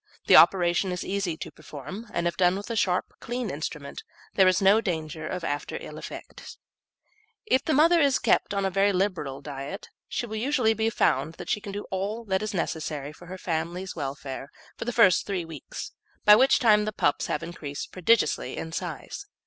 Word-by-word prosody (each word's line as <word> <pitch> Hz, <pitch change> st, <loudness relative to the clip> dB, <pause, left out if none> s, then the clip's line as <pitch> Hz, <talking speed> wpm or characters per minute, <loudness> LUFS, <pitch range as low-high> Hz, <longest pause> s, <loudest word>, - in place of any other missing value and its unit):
The -, -, +6 dB
operation 180 Hz, 0 st, +5 dB
is 180 Hz, -, -4 dB
easy 195 Hz, -4 st, -2 dB
to -, -, -7 dB
perform, 170 Hz, -, -9 dB
and 170 Hz, -3 st, 0 dB
if 170 Hz, -, -2 dB
done 180 Hz, 0 st, +3 dB
with 205 Hz, +4 st, -6 dB
a -, -, -2 dB
sharp, 185 Hz, -4 st, 0 dB
clean 240 Hz, -3 st, -3 dB
instrument 145 Hz, -1 st, -5 dB, 0.3 s
there 190 Hz, -1 st, +5 dB
is 185 Hz, 0 st, +4 dB
no 200 Hz, +2 st, +5 dB
danger 160 Hz, -5 st, -3 dB
of 180 Hz, 0 st, -4 dB
after 145 Hz, -2 st, -3 dB
ill -, -, -9 dB
effects. -, -, -9 dB, 0.9 s
If 265 Hz, -9 st, +2 dB
the 310 Hz, -, +1 dB
mother 330 Hz, +2 st, +5 dB
be 280 Hz, -, +4 dB
kept -, -, +3 dB
on 200 Hz, -1 st, 0 dB
a 190 Hz, -, 0 dB
very 195 Hz, +1 st, +3 dB
liberal 175 Hz, -8 st, -1 dB
diet, 140 Hz, +6 st, -7 dB, 0.3 s
it -, -, -1 dB
will 220 Hz, 0 st, -5 dB
usually 240 Hz, -2 st, +2 dB
be 220 Hz, +1 st, 0 dB
found 155 Hz, -7 st, +1 dB
that -, -, -6 dB
she 210 Hz, -, 0 dB
will 200 Hz, -, -6 dB
do 205 Hz, +1 st, -5 dB
all 205 Hz, +5 st, -3 dB
that 190 Hz, -1 st, 0 dB
is 215 Hz, 0 st, -2 dB
necessary 150 Hz, -4 st, -3 dB
for 175 Hz, +3 st, -14 dB
her 185 Hz, +2 st, -7 dB
family's 175 Hz, +2 st, -3 dB
welfare 140 Hz, -2 st, -5 dB, 0.3 s
for -, -, -6 dB
the 245 Hz, -, -1 dB
first 195 Hz, -7 st, +4 dB
three 190 Hz, -4 st, -2 dB
weeks, 165 Hz, -, -8 dB, 0.3 s
by 210 Hz, -1 st, +10 dB
which 260 Hz, +5 st, +5 dB
time 210 Hz, -5 st, +4 dB
the 215 Hz, -, -2 dB
pups 145 Hz, -7 st, +1 dB
have 150 Hz, -, -2 dB
increased 155 Hz, -4 st, -6 dB
prodigiously 210 Hz, +5 st, +1 dB
in 160 Hz, -, -5 dB
size. 165 Hz, -3 st, -6 dB
185 Hz, 195 wpm, -26 LUFS, 160-215 Hz, 0.9 s, by